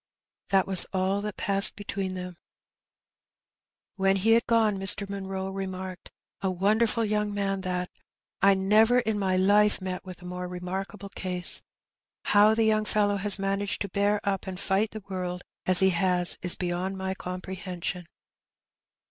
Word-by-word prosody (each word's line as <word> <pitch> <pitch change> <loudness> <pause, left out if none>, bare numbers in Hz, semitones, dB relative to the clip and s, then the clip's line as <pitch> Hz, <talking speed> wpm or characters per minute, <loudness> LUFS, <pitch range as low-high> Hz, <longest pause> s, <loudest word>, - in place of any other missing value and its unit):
That 195 -1 +3
was 190 -2 +7
all 190 +1 0
that 210 -1 -6
passed 200 0 +3
between 195 -2 -4
them. 180 -1 -7 1.6
When 195 0 +2
he 200 +4 +1
had 230 +1 +3
gone 220 -4 +2
Mr. 195 +1 0
Munroe 195 -1 -5
remarked, 190 -1 -6 0.3
"A 190 - 0
wonder 205 +5 +2
ful 230 +1 -1
young 210 0 -1
man 195 -1 -2
that; 180 -1 -3 0.5
I 195 0 +5
never 215 +6 +3
in 220 -3 -2
my 190 -2 0
Ufe 205 +2 +3
met 185 -1 -5
with 185 -1 -11
a - - -11
more 180 0 -5
remarkable 190 +3 -6
case. 180 -2 -1 0.6
How 210 +1 +4
the 225 - +2
young 215 -1 +2
fellow 205 -1 +1
has 200 0 +5
managed 195 0 -2
to 200 - -3
bear 205 +2 +1
up 195 -1 -2
and 185 -1 -6
fight 200 +2 0
the 215 -2 -9
world 180 -2 -5 0.2
as 185 0 +6
he 190 0 +4
has 180 0 +2
is 180 -1 +6
beyond 180 +2 -3
my 190 0 -3
com 180 -1 -6
prehension." 180 -1 -6
195 Hz, 165 wpm, -26 LUFS, 185-205 Hz, 1.6 s, was